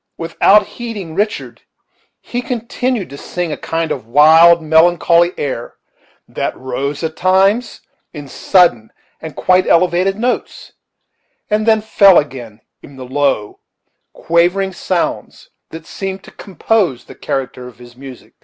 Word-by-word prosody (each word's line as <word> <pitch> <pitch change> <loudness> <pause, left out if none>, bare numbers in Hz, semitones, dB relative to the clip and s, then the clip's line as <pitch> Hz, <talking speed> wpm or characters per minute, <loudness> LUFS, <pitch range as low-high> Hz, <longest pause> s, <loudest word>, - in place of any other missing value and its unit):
Without 195 +5 +3
heeding 210 -9 -8
Richard, 205 +5 -3 0.6
he 245 - -5
continued 245 - -3
to 140 - -10
sing 175 -2 -4
a - - -2
kind 165 0 -3
of 125 -5 -5
wild, 160 +6 +6
melancholy 170 +2 +3
air, 130 -4 -5 0.5
that - - -4
rose, 135 +4 -4
at 160 -1 -3
times, 195 +7 +1 0.3
in 145 -3 -9
sudden 135 - +1 0.3
and 160 -2 -9
quite 185 0 +2
elevated 180 +2 +2
notes, 245 +3 -4 0.8
and 215 +1 0
then 220 -1 +3
fell 200 -3 +5
again 120 -7 -3 0.2
into 140 - -15
the 130 - -8
low, 140 -7 -1 0.5
quavering 180 +3 0
sounds 175 0 -4 0.2
that 160 0 -10
seemed 195 +1 -6
to - - -14
compose 185 - -2
the - - -13
character 125 -2 -5
of 125 - -14
his 120 0 -15
music. 130 -1 -13
170 Hz, 135 wpm, -16 LUFS, 140-195 Hz, 0.8 s, wild